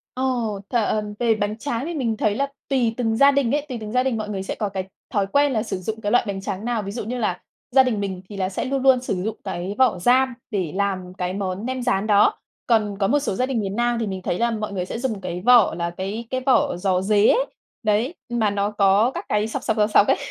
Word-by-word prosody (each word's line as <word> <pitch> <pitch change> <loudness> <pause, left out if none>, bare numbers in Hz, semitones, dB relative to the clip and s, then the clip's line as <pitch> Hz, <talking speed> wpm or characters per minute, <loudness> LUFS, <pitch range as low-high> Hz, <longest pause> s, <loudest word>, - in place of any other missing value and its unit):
Ờ, 260 - -2 0.5
th - - -5
ờm, 210 -2 0
về 230 -2 +3
bánh 210 +1 -2
tráng 240 +1 -3
thì 340 - -4
mình 230 -7 -1
thấy 210 -1 +1
là 280 +2 0 0.2
tùy 245 -5 +2
từng 225 -2 0
gia 280 +1 +7
đình 275 -4 +1
ấy, 295 - -2
tùy 250 - -3
từng 210 0 -6
gia 255 +1 +2
đình 255 -4 0
mọi 215 -1 -4
người 190 -2 -3
sẽ - - -4
có 210 -3 -2
cái 190 -1 -4 0.3
thói 200 -2 +1
quen 285 +7 +3
là 220 -2 0
sử 205 -4 -3
dụng 220 +4 -5
cái 205 0 -1
loại 245 - +4
bánh 195 -1 -3
tráng 200 +1 -4
nào. 235 -3 0
Ví 195 - -5
dụ 235 - -4
như 240 +4 -4
là 210 -7 -1 0.3
gia 265 +1 +6
đình 230 -5 -1
mình 190 -2 -3
thì 205 - -8
là 185 -1 0
sẽ 195 - -3
luôn 270 0 -1
luôn 260 -2 +5
sử 190 -7 -2
dụng 220 0 -2
cái 190 +1 -4
vỏ 260 -8 +3
ram 255 +5 +3 0.2
để 185 -7 -1
làm 190 -2 -2
cái 180 0 -2
món 195 +1 -3
nem 255 0 -3
rán 215 -4 0
đó, 210 0 +4 0.3
còn 210 -4 +2
có 195 - +2
một 290 +5 +3
số 275 - -2
gia 255 - +1
đình 260 -4 -1
miền 195 0 -3
Nam 240 0 +1
thì 220 - -1
mình 190 -1 -4
thấy 175 - -2
là 235 0 +2
mọi 215 -2 -3
người 180 -2 -2
sẽ 230 - -5
dùng 225 -6 -2
cái 180 -1 -4
vỏ 245 -7 +6
là 170 0 -2
cái 195 +6 -5
cái 260 0 -2
vỏ 245 -9 +3
giò 185 0 +1
rế 205 +2 +3
ấy. - - +4 0.4
Đấy, 215 +7 +1 0.2
ừm, 240 0 -2
mà 215 -2 +3
nó 200 0 0
có 205 +4 +3
các 350 - -5
cái 210 +1 +1
sọc, - - -4
sọc, 220 - 0
sọc, 210 0 +3
sọc 205 - +6
ấy. - - +3
215 Hz, 280 wpm, -23 LUFS, 195-245 Hz, 0.5 s, gia